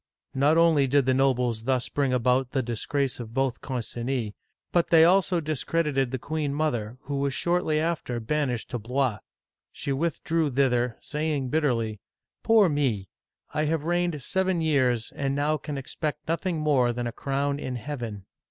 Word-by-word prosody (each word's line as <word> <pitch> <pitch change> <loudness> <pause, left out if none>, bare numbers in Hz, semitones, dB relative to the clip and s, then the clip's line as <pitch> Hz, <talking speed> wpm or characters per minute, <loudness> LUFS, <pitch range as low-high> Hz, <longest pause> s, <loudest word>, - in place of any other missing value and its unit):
Not 145 +4 +3
only 160 -5 +4
did 140 0 +3
the 130 - +3
nobles 125 -4 +1
thus 130 -1 +1
bring 140 -2 0
about 125 +1 +1
the 135 -2 +1
disgrace 125 +4 -2
of 115 -1 -8
both 135 -2 0
Concinis, 120 -2 -3 0.4
but 175 -1 +2
they 165 -1 +7
also 185 0 +4
discredited 150 -3 0
the 130 - -2
queen 145 +1 -2
mother, 125 -7 -1
who 140 -1 -4
was 140 -1 0
shortly 170 -3 +1
after 155 -7 -1
banished 125 0 -2
to 120 - -2
Blois. 125 0 0 0.5
She 140 - -4
withdrew 165 +1 0
thither, 125 -3 +1
saying 150 -3 -2
bitterly, 120 -8 0 0.4
Poor 225 -3 +5
me! 130 - 0 0.4
I 150 +1 +1
have 155 -1 0
reigned 175 -3 0
seven 190 -2 0
years, 130 -7 +1
and 140 -1 -1
now 150 +2 +1
can 150 -1 -6
expect 150 +2 -4
nothing 165 +2 -1
more 140 -6 +2
than 120 0 -3
a 120 - -2
crown 140 +3 -1
in 130 -3 -4
Heaven 120 -6 -5
140 Hz, 160 wpm, -26 LUFS, 125-155 Hz, 0.5 s, they